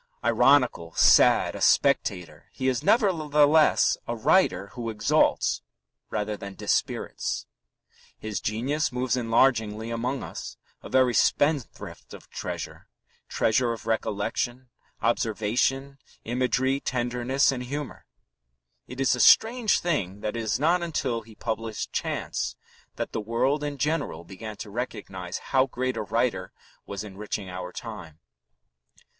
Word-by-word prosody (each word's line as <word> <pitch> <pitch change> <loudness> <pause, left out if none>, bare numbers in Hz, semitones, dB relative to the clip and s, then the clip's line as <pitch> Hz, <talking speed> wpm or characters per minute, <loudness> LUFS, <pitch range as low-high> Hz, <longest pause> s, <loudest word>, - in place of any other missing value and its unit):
Ironical, 125 - +3
sad, - - +5
a - - -7
spectator, 85 -4 +1
he 130 - -2
is 125 -3 +1
nevertheless 155 - +4
a 120 - -2
writer 110 - +2
who 120 0 -5
exalts 105 -1 +2 0.5
rather 105 0 -2
than 100 -1 -8
dispirits. - - -2 0.7
His 110 -1 -4
genius 130 +8 -1
moves 125 -1 0
enlargingly 115 -2 +1
among 125 +4 -2
us, - - -7 0.2
a - - -10
very 130 -2 +3
spendthrift 145 -1 0
of - - -16
treasure - - -6 0.4
treasure 115 +2 +1
of 115 - -9
recollection, 120 +3 -2 0.3
observation, 120 +5 0 0.2
imagery, 130 +3 0
tenderness, 125 +2 +1
and 130 -2 -4
humour. 140 +3 -6 0.8
It 125 +1 -9
is 135 - +3
a 125 - -2
strange 225 - +5
thing 105 - -2
that 105 +2 -3
it 115 - -2
was 110 +1 -1
not 170 +5 +3
until 150 -8 -2
he 110 0 -16
published 110 -1 -4
Chance - - -2 0.4
that - - -4
the - - -3
world 130 +7 0
in 145 -1 -3
general 145 - -1
began 105 +4 -9
to 105 - -8
recognize 95 -6 -5 0.2
how 130 0 +4
great 130 0 -2
a - - -2
writer 110 -3 -1 0.4
was 100 +1 -5
enriching 105 -1 -6
our 90 0 -6
time. 85 -10 -9
120 Hz, 125 wpm, -26 LUFS, 105-135 Hz, 0.8 s, sad